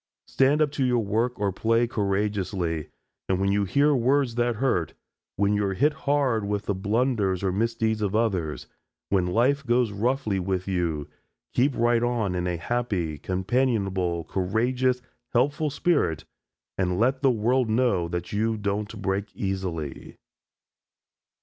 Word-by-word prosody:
Stand 140 +3 +3
up 145 - -1
to 140 - -1
your 125 -2 +2
work 115 +4 -1
or 100 -1 +1
play 115 +5 +2
courageously, 100 - -1 0.4
and 95 -1 +1
when 100 0 +1
you 100 0 +1
hear 140 +10 +3
words 130 0 +2
that 120 0 0
hurt, 105 - 0 0.4
when 100 +1 +2
you 105 0 +1
are 95 -1 -1
hit 150 +8 +3
hard 140 -7 +1
with 105 0 -2
the 100 - 0
blunders 105 -1 0
or 95 - +1
misdeeds 110 +1 0
of 105 -1 -1
others, 95 -9 0 0.4
when 95 -3 +2
life 125 +9 +2
goes 120 -3 +2
roughly 110 -1 0
with 95 0 -2
you, 85 -6 -1 0.5
keep 130 +2 +2
right 120 0 +3
on 120 -6 0
in 90 0 -1
a 90 -1 -1
happy, 90 -6 -2
companionable, 95 - 0
courageous, 125 +8 0 0.3
helpful 145 +5 +2
spirit, 145 - 0 0.5
and 90 -1 0
let 130 +3 +2
the 135 - +4
world 120 +1 +1
know 110 -7 +2
that 85 +2 -4
you 110 +2 0
don't 105 +1 -3
break 95 +1 0
easily. 95 - -4
105 Hz, 150 wpm, -26 LUFS, 95-125 Hz, 0.5 s, the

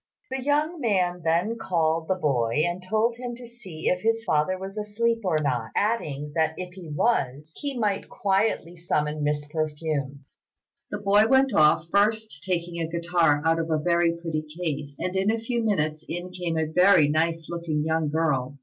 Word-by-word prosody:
The 265 - -2
young 300 +5 0
man 180 -6 +1
then 175 +8 +1
called 165 -4 0
the 190 - +1
boy 140 -5 +1
and 175 +1 -2
told 220 +5 0
him 245 -1 -5
to 245 0 -11
see 220 -10 -8
if 180 0 +1
his 225 +1 +1
father 170 -1 +1
was 195 +2 -7
asleep 225 +2 0
or 180 -5 +1
not; 125 -7 -1
adding, 150 -10 -1
that 160 0 +1
if 180 -1 -6
he 180 -4 -10
was, 150 - 0
he 280 -3 -4
might 210 -4 -1
quietly 195 -3 0
summon 150 -3 -1
Miss 145 0 0
Perfume. 150 -2 -3 0.6
The - - -3
boy 205 +2 +4
went 265 0 +4
off, 155 -1 +4
first 215 -5 +1
taking 175 -2 -2
a 160 - -2
guitar 170 -3 +2
out 165 0 +3
of 165 0 -2
a 160 - +2
very 170 +1 +2
pretty 165 -2 -2 0.2
case; 145 -4 -3
and 185 +1 -3
in 190 +2 +2
a 225 - +2
few 235 +1 -2
minutes 155 -8 0
in 175 +1 -5
came 175 -3 -3
a 160 - +1
very 180 0 +5
nice 165 +2 0
looking 170 -3 -2
young 160 -1 0
girl. 140 -4 0
170 Hz, 185 wpm, -25 LUFS, 155-205 Hz, 0.6 s, very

